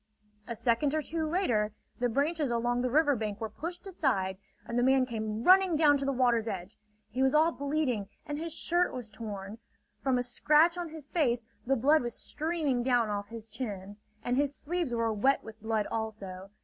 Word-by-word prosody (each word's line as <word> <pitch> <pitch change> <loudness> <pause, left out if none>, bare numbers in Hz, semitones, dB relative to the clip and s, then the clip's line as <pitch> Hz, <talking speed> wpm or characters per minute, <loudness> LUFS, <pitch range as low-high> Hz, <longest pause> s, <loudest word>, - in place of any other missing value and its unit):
A 235 - -4
second 235 +6 +1
or 310 - 0
two 320 +2 -2
later, 230 - +1 0.3
the 245 0 +1
branches 290 +4 0
along 240 +1 0
the 250 - 0
river 290 +1 +4
bank 215 -3 -3
were 220 -1 -4
pushed 345 - -6
aside, 225 - -1 0.3
and 235 - -5
the - - +3
man 260 +1 +4
came 220 -2 -4
running 370 0 +6
down 300 -2 +5
to 275 - -3
the 275 - +1
water's 240 -3 +2
edge. 190 -1 -5 0.4
He 250 +4 -2
was 265 +2 +3
all 315 +2 +5
bleeding 280 -9 -1 0.2
and 295 0 -4
his 330 +1 -4
shirt 345 +2 +1
was 240 -4 -7
torn. 210 -1 -7 0.4
From 265 -2 +2
a 245 - 0
scratch 300 +7 +4
on 350 -2 -4
his 310 -2 -8
face 255 -8 +1 0.2
the 270 - +3
blood 290 +6 +4
was 240 -1 -4
streaming 305 -5 -1
down 240 -3 +2
off 205 -1 -3
his 225 0 -9
chin, 205 -4 -6 0.3
and 245 +1 0
his 285 0 +1
sleeves 340 -2 -2
were 230 -1 0
wet 265 +7 +2
with 220 0 -11
blood 220 -1 0
also. 200 -4 -5
250 Hz, 200 wpm, -30 LUFS, 220-300 Hz, 0.4 s, running